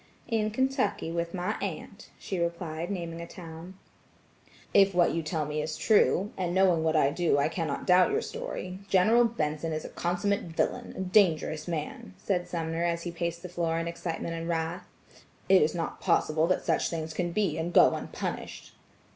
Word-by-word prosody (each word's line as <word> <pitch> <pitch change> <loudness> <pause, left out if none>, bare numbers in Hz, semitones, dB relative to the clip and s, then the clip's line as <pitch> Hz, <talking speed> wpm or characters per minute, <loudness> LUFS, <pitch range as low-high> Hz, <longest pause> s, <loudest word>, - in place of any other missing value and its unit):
"In 220 -2 +1
Kentucky 255 - 0
with 170 0 -2
my 180 0 -1
aunt," - - -6
she 190 - -4
replied 170 -1 -3
naming 170 -4 -4
a 170 - -7
town. 170 +1 -10 1.0
"If 195 -2 +5
what 175 -1 +4
you 165 - 0
tell 155 -1 -2
me 150 +1 -2
is 155 0 -4
true, 205 -2 +3
and 180 -1 -2
knowing 185 -4 +4
what 160 0 +1
I 140 -2 +4
do, 165 -2 +1
I 140 +2 +2
cannot 160 -5 -3
doubt 180 0 +5
your 435 +3 0
story, 465 - -5
General 220 +6 +5
Benson 160 -7 -2
is 155 - -4
a - - -6
consummate 195 +4 -1
villain, 165 -2 -2
a - - -3
dangerous 175 -5 +2
man," 150 - -5
said 180 -3 -1
Sumner 165 0 -2
as 170 -1 0
he 175 - -4
paced 170 0 -3
the 180 - -6
floor 170 -2 -1
in 165 0 -2
excitement 170 0 -4
and 165 0 -4
wrath. 165 +1 -2 0.6
"It 190 -1 +6
is 155 +2 +2
not 165 -2 -4
possible 155 +1 +2
that 185 - 0
such - - +1
things 160 -1 -4
can 175 +2 -1
be 180 -5 0
and 165 +2 -2
go - - +6
unpunished." - - -5
170 Hz, 185 wpm, -28 LUFS, 160-185 Hz, 1.0 s, It